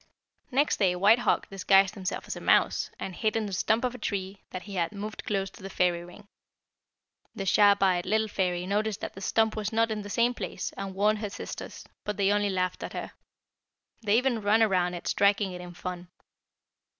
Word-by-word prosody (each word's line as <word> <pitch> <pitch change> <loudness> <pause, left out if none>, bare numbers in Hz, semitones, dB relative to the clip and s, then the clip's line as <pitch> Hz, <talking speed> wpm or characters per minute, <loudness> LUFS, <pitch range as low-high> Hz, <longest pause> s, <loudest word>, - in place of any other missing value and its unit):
"Next 285 +3 +2
day 185 -3 +3
White 205 +6 +5
Hawk - - +1
disguised 195 0 +4
himself 190 -2 -4
as - - -5
a - - -8
mouse, - - +3
and 190 - -5
hid 215 +4 -1
in 225 -1 0
the 200 - -5
stump 220 +6 +1
of 250 -1 0
a 250 - -9
tree 195 -1 -4
that 185 - -6
he 205 - -9
had 170 -3 0
moved 210 +1 -6
close 195 -2 -1
to - - -15
the 195 - -7
fairy 175 -2 +1
ring. 180 +4 -14 1.1
The 195 - -4
sharp 200 +1 +5
eyed 180 -2 +2
little 220 +1 +2
fairy 180 -3 -1
noticed 210 +2 -1
that - - -5
the 195 - -10
stump 220 +3 +1
was 210 -1 -2
not 225 0 +2
in 215 -1 -2
the 205 - -8
same 235 +4 +2
place, 185 -7 -5
and 195 -1 -6
warned 210 +2 +2
her 210 -1 -3
sisters, - - -7 0.2
but 210 -1 -3
they 200 0 +3
only 205 0 +2
laughed 185 -1 -1
at - - -6
her. - - -5 0.9
They 215 0 +3
even 250 -3 +1
ran 210 +2 +4
around 180 -4 +1
it 175 - -7
striking 200 -1 +2
it 180 0 -7
in 175 -1 -10
fun. 180 0 -6
200 Hz, 210 wpm, -28 LUFS, 185-215 Hz, 1.1 s, White